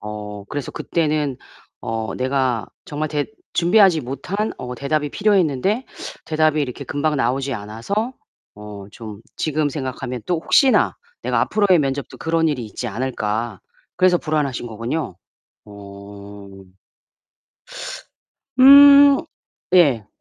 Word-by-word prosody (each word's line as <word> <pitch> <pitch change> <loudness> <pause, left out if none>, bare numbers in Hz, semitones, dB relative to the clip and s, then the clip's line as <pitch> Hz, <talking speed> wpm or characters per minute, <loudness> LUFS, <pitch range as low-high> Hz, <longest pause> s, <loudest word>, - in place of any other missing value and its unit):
어 105 -1 -7
그래서 145 -4 -5
그때는 150 -4 -1 0.4
어 115 -1 -4
내가 130 -5 0 0.2
정말 155 +1 -4
대 145 -1 -2 0.3
준비하지 180 -1 +4
못한 150 - -4
어 125 0 -6
대답이 145 +3 -2
필요했는데 200 - +1 0.4
대답이 155 -1 +1
이렇게 125 -3 -5
금방 150 +1 -1
나오지 130 +2 -1
않아서 115 - -4 0.4
어 105 -1 -10
좀 110 -2 -10 0.2
지금 155 -1 0
생각하면 130 -3 -5
또 180 - +1
'혹시나 265 - +3 0.3
내가 - - 0
앞으로의 200 -5 +3
면접도 140 -1 -3
그런 165 0 +1
일이 130 -6 -2
있지 110 +3 -6
않을까?' 110 -2 -3 0.4
그래서 185 -1 +4
불안하신 150 -7 -2
거군요. 115 - -4 0.5
어. 100 0 -12 2.1
음. 280 +1 +9 0.6
예. 135 - +4
140 Hz, 250 characters per minute, -20 LUFS, 115-165 Hz, 2.1 s, 음